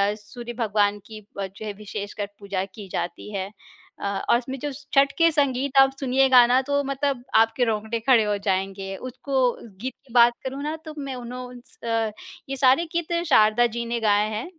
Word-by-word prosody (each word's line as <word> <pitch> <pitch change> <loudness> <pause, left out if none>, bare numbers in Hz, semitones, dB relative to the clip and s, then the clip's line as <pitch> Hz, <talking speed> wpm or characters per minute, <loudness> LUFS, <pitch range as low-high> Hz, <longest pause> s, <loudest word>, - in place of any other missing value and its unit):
सूर्य 235 +3 -9
भगवान 205 -2 +1
की 215 -1 -10 0.2
अ, 195 - -1
जो 200 +3 -10
है 205 - -4
विशेषकर 205 0 -5
पूजा 200 -2 -3
की 200 +1 -11
जाती 210 +4 -4
है। 195 0 -3 0.5
अ, - - -5 0.2
और 235 - +6
उसमें 260 +2 -5
जो 290 +1 -3
स 290 +2 -11
छठ 275 0 +5
के 330 0 +5
संगीत 275 -2 0
आप 270 0 +6
सुनिएगा 260 -2 +5
ना, 255 +2 +4
तो 285 +1 0
मतलब 275 -2 -2
आपके 225 +2 +4
रौंगटे 220 +1 -1
खड़े 230 -1 +4
हो 205 -1 0
जाएँगे। 195 0 -2
उसको 260 +2 -6 0.5
गीत 260 +1 -3
की 235 - -16
बात 240 0 +6
करूँ 270 +2 -4
ना, 305 +2 -2
तो 310 - -7
मैं 275 -2 -5
उन्हों 250 +1 -7
उनस 245 -1 -14
अ, 225 -2 0 0.4
ये 275 - -2
सारे 265 +5 +4
गीत 340 0 -1
शारदा 220 -2 +5
जी 235 0 -2
ने 235 0 -2
गाए 210 -1 +2
हैं। 215 +2 -4
240 Hz, 195 wpm, -24 LUFS, 210-270 Hz, 0.5 s, और